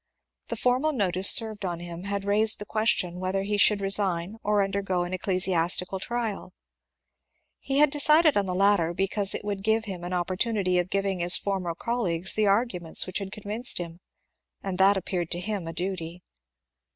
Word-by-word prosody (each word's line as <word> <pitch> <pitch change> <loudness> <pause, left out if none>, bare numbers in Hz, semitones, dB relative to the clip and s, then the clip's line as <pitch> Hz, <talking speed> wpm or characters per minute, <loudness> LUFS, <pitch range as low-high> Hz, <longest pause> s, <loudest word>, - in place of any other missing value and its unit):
The - - -4
formal 255 +5 0
notice 190 -5 +2
served 215 -3 +3
on 175 -3 -3
him 175 +1 -8
had 200 0 -3
raised 215 +2 +3
the 210 - -8
question 205 -5 -1
whether 190 +1 -2
he 205 +1 -2
should 205 0 +4
resign 195 -1 +1
or 210 -1 +1
undergo 195 -2 -2
an 175 +1 -6
ecclesiastical 185 -1 0
trial. 225 -4 -4 1.0
He 275 0 -3
had 300 -1 +4
decided 305 +1 +4
on 200 -1 +1
the 180 - -3
latter, 185 -3 +2
because 195 +1 +2
it - - -6
would 200 -1 -3
give 220 +2 +1
him 185 -4 -7
an 175 - -5
opportu 185 +5 -1
nity 185 -2 +1
of 180 +1 -2
giving 195 -1 -1
his 175 +1 +3
former 185 -4 -3
colleagues 190 -6 -1
the 215 -1 +1
arguments 195 -5 +1
which 185 - -4
had 195 -1 -7
convinced 210 +4 -1
him, 170 -1 -7 0.6
and 190 -2 -4
that 195 +1 +5
appeared 180 -2 -3
to 175 - -1
him 195 -2 -4
a - - -4
duty. 175 0 -5
195 Hz, 180 wpm, -26 LUFS, 180-210 Hz, 1.0 s, that